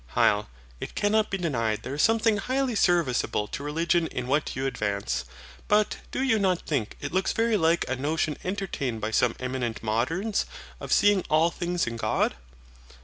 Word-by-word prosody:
HYL. 105 0 +3 0.3
It - - -7
cannot 215 +1 +2
be 195 - -1
denied 115 - -1
there 130 - -5
is 145 - 0
something 225 -1 +3
highly 255 +4 0
serviceable 170 - +2
to - - -5
religion 165 +3 +1
in 125 - -4
what 145 +4 0
you 130 +1 -2
advance. 100 - -2 0.4
But 210 0 +2
do 260 - -2
you 225 -5 +3
not 185 -3 +1
think 130 -9 -2
it 145 - -4
looks 190 +1 +1
very 225 0 +2
like 165 -2 +2
a 130 - -1
notion 150 +3 -1
entertained 180 - -3
by 110 +1 -3
some 115 +1 +2
eminent 125 -3 -3
moderns, 160 - 0 0.3
of - - -7
SEEING 205 -2 +4
ALL 160 +2 +4
THINGS 175 0 -1
IN 115 +1 -4
GOD? - - +1
160 Hz, 175 wpm, -26 LUFS, 125-195 Hz, 0.4 s, SEEING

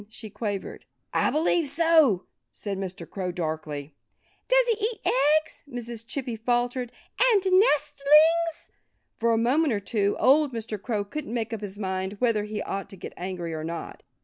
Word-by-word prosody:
she 220 -1 -10
quavered. 205 -3 -4 0.3
"I - - +2
believe 320 +1 +2
so," 300 - +4 0.3
said 200 -2 -5
Mr. 190 0 -6
Crow 185 -2 -4
darkly. 155 -4 -4 0.5
"Does - - +4
he 440 -2 0
eat 450 -3 -7
eggs?" 300 +4 +2
Mrs. 235 -2 -6
Chippy 260 -3 -3
faltered. 245 +2 -1 0.4
"And 405 -4 +3
nestlings?" 320 - +4 0.5
For 235 0 +2
a 225 - +3
moment 260 +5 +2
or 205 - 0
two 200 0 0
old 285 0 +4
Mr. 220 -3 -5
Crow 210 -3 -2
couldn't 300 +4 -6
make 230 -1 -2
up 220 - -4
his 205 -1 -7
mind 190 -1 -3
whether 220 -2 +1
he 210 0 -4
ought 195 0 -4
to - - -10
get - - -8
angry 175 -2 -5
or 155 -1 -4
not. 165 +1 -6
230 Hz, 165 wpm, -26 LUFS, 195-300 Hz, 0.5 s, so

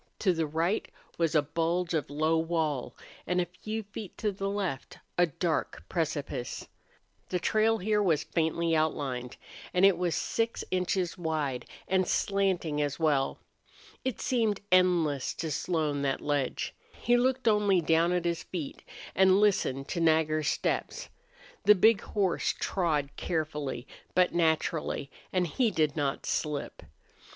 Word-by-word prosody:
To 190 -4 +2
the 165 -2 -1
right 165 +7 0 0.3
was 165 -1 +1
a 150 - +5
bulge 170 +3 -1
of 150 -5 -1
low 155 +3 +1
wall, 160 -5 -1 0.3
and 180 +1 +1
a 180 - +2
few 215 +6 -5
feet 205 -1 -9
to 210 - 0
the 195 0 -3
left 190 -9 -3 0.2
a 175 0 +4
dark 165 +2 -2
precipice. 150 -7 -3 0.6
The 180 - 0
trail 220 +3 +2
here 210 +1 +1
was 165 -7 +2
faintly 165 0 0
outlined, 135 -6 -1 0.4
and 180 +2 +6
it 195 -3 +5
was 175 -2 0
six 230 0 -1
inches 185 -1 0
wide 155 -6 -2 0.2
and 185 -1 +2
slanting 185 -7 +1
as 145 -1 -1
well. 145 -4 +1 0.7
It 260 -4 -2
seemed 225 -5 +1
endless 175 -7 +3
to 160 -2 -3
Slone, 150 -2 -1
that 135 -1 0
ledge. 145 -3 -1 0.2
He 240 - +1
looked 255 0 +1
only 210 -3 +4
down 165 +1 +3
at 180 -1 0
his 170 -1 0
feet 165 -4 -6 0.3
and 190 0 +5
listened 160 -10 +2
to 175 - -2
Nagger's 155 -2 +2
steps. - - -1 0.6
The 210 - +8
big 215 +2 +5
horse 195 -4 0
trod 155 -7 0
carefully, 150 -6 -3 0.3
but 180 -1 +4
naturally, 160 -3 0 0.2
and 185 -1 +1
he 225 - +1
did 155 -7 +1
not 145 -3 -1
slip. 150 -2 -2
170 Hz, 145 wpm, -29 LUFS, 150-190 Hz, 0.7 s, The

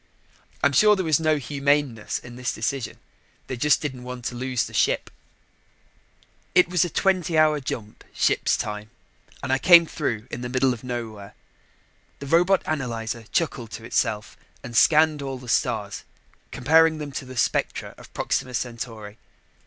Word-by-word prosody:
I'm 140 - +5
sure 210 +8 +5
there 190 -2 -2
was 155 -2 +3
no 155 -1 +2
humaneness 140 -3 0
in 120 -1 -11
this 125 0 -2
decision. 125 +3 -3 0.5
They 130 - -5
just 150 +5 +3
didn't 130 -4 -4
want 125 -1 -8
to 125 - -3
lose 130 0 -1
the - - -10
ship. - - +1 1.4
It 180 - +6
was 180 -2 +3
a 175 - -2
twenty 180 -3 +1
hour 155 -1 +4
jump, 110 -5 -6
ship's - - +1
time, 105 0 -5 0.5
and 130 - 0
I 135 - +2
came 170 +1 +8
through 120 -9 -3
in 120 - -5
the 125 - -4
middle 130 0 +2
of 115 - -10
nowhere. 115 -5 -6 0.8
The 140 - -8
robot 175 +6 +3
analyzer 115 -6 -3
chuckled 130 -8 -1
to 115 - -7
itself 110 -2 -1 0.3
and 120 0 -8
scanned 155 +3 +5
all 135 -1 -4
the 125 -1 -12
stars, 110 -3 -1 0.5
comparing 160 +4 +4
them 150 -2 -6
to 135 - -5
the 130 -1 -10
spectra - - -1
of - - -14
Proxima 125 -1 -1
Centauri. 115 -3 -5
130 Hz, 160 wpm, -24 LUFS, 115-155 Hz, 1.4 s, came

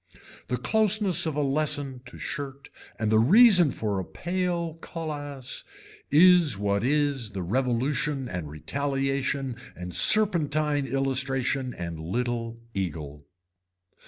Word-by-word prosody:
The 125 - -2
closeness 200 - +2
of 155 - -3
a 150 - 0
lesson 140 -2 0
to 120 - -10
shirt 140 -2 -7 0.3
and 110 -2 -1
the 110 - +4
reason 185 - +6
for 105 -6 -3
a - - -3
pale 175 - -3
cullass 145 -5 -5 0.5
is 170 - +5
what 100 0 -1
is 140 -5 0
the 95 -2 -4
revolution 130 - -1
and 90 -8 -5
retaliation 135 - -2 0.2
and 90 0 -8
serpentine 155 -8 +4
illustration 135 -1 -1
and 85 -2 -6
little 115 +6 -3
eagle. 75 -7 -5
135 Hz, 115 wpm, -26 LUFS, 115-150 Hz, 0.5 s, reason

